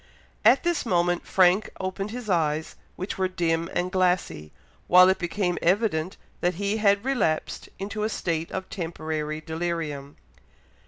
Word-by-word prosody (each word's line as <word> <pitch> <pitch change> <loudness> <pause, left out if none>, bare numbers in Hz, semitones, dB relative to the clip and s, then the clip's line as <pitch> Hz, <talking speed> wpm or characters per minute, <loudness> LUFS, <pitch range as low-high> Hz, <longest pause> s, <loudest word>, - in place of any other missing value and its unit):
At 235 +5 +5
this 345 -1 0
moment 175 -4 0
Frank 185 +2 +4
opened 190 +2 -3
his 240 0 -7
eyes, 160 -4 0 0.2
which 185 +1 -5
were 190 - +2
dim 170 -2 -1
and 180 +1 -1
glassy, 180 - 0 0.4
while 180 +1 +8
it 190 - +1
became 180 0 -1
evident 180 -2 +1 0.2
that 180 0 0
he 200 +3 -1
had 200 0 +2
relapsed 245 -13 -1
into 205 +2 -5
a 215 - 0
state 165 -5 -2
of 190 0 -4
temporary 155 -3 -4
delirium. 160 -3 -4
180 Hz, 145 wpm, -25 LUFS, 165-200 Hz, 0.4 s, while